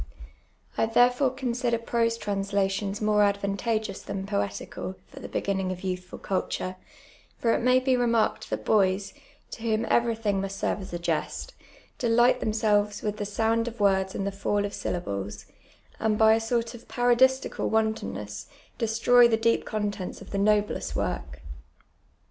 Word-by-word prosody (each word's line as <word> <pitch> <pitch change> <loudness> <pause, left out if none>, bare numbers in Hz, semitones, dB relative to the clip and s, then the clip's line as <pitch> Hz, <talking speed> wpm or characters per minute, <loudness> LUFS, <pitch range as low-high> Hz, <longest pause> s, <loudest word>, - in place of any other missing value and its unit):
I - - +3
therefore 245 +4 +4
consider 250 -2 -1
prose 230 0 0
translations 200 0 -1
more 210 0 +3
advantageous 200 +1 0
than 190 0 -5
poetical, 185 - -3
for - - -11
the - - -7
begin 200 -1 -1
ning 190 -1 -1
of 180 -1 -6
youthfid 185 -1 -5
culture; 185 -1 -2 0.6
for 230 -1 +2
it - - 0
may 255 +1 +4
be 255 0 +2
remarked 235 -3 +1
that - - -4
boys, 195 -2 +2 0.4
to - - -8
whom 225 0 0
everything 225 -4 +1
must 195 0 -4
serve 200 - -1
as 190 - -8
a 175 - -3
jest, 175 - -3 0.5
delight 240 +1 +4
themselves 210 -1 +1
with 210 0 -2
the 205 - -3
sound 225 +3 0
of 235 -1 -6
words 190 -2 +2
and 195 - -2
the 200 - -1
fall 200 +1 -1
of 205 - -5
syllables, 100 - -4 0.5
and 220 -1 +1
by 220 0 +6
a 225 - +3
sort 230 +1 -1
of 240 - -12
parodistical 255 +2 +2
wantonness, 105 - -2 0.3
destroy 235 +1 +5
the 225 -1 +2
deep 230 +1 +1
contents 205 -3 -3
of - - -12
the 200 - -1
noblest 210 0 +1
work. - - -3
215 Hz, 155 wpm, -27 LUFS, 195-230 Hz, 0.6 s, by